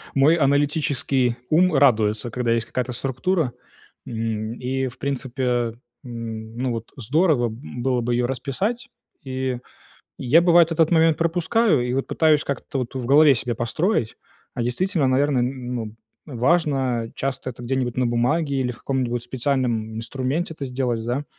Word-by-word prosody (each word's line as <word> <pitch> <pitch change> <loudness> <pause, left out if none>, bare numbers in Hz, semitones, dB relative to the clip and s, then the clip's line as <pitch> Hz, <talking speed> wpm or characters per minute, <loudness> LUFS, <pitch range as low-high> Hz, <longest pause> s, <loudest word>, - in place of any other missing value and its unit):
Мой 140 +4 +5
аналитический 140 -4 +1
ум 180 +2 +4
радуется, 110 -5 +3
когда 120 0 -1
есть 115 -1 +1
какая-то 125 0 -3
структура. 135 +4 -1 0.5
М, 110 -1 -3
и, 130 +2 -2
в 125 0 -10
принципе, 135 -1 -3 0.6
м, 115 -2 -7
ну 125 0 -1
вот 115 -1 -5
здорово, 140 - +2
м, 120 +2 -8
было 125 -2 +1
бы 120 +1 -1
ее 120 0 +1
расписать, 195 - -3 0.3
и 130 -2 -3 0.6
я, 140 +7 +4
бывает, 170 -1 +5
этот 165 -1 +3
момент 165 -2 +4
пропускаю. 175 - +2
И 125 - -1
вот 135 - -1
пытаюсь 155 -2 +3
как-то 140 0 -4
вот 125 +1 -5
в 130 -2 -4
голове 145 +2 +6
себе 120 0 -2
построить. 120 - -1 0.4
А 120 - -2
действительно, 155 +6 0
наверное, 130 0 +2
н 125 0 -3
ну, 110 -2 -5 0.3
важно, 135 -3 +1
э, - - -14
часто 135 -1 -3
это 120 0 -11
где-нибудь 125 -1 -2
на 125 -1 +2
бумаге 140 +5 +1
или 125 -1 0
в 115 - -15
каком-нибудь 125 -3 -2
специальном 120 -3 -1
инструменте 130 +8 -2
это 145 - -6
сделать, 125 -3 -2
да, 125 +5 -2
130 Hz, 155 wpm, -23 LUFS, 120-145 Hz, 0.6 s, голове